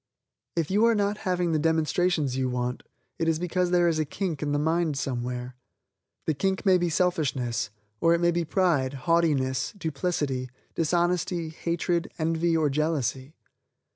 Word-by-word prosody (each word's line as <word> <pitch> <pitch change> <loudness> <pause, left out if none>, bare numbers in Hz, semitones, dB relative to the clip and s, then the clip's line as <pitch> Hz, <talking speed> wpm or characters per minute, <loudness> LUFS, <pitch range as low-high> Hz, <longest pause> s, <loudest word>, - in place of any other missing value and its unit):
If 165 0 -1
you 205 +3 +3
are 230 -1 +4
not 205 0 0
having 180 -2 +1
the 155 - +2
demonstrations 160 -2 +1
you 130 -1 0
want, 125 0 -2 0.4
it 165 - 0
is 165 -1 +2
because 180 +1 0
there 175 -1 +4
is 160 -2 +1
a - - +3
kink 160 0 -3
in 150 -1 -1
the 145 - +1
mind 160 0 +1
somewhere. 125 -1 -3 0.7
The 155 - +1
kink 190 +8 -1
may 185 -2 +5
be 175 0 +1
selfishness, 140 -10 0 0.3
or 165 0 +4
it - - 0
may 175 0 +3
be 170 0 0
pride, 160 -7 +1
haughtiness, 145 -6 +2
duplicity, 145 -7 -2 0.2
dishonesty, 175 0 0
hatred, 170 +1 -1
envy 165 +1 +1
or 155 -2 +2
jealousy. 145 -2 -1
165 Hz, 160 wpm, -27 LUFS, 140-175 Hz, 0.7 s, may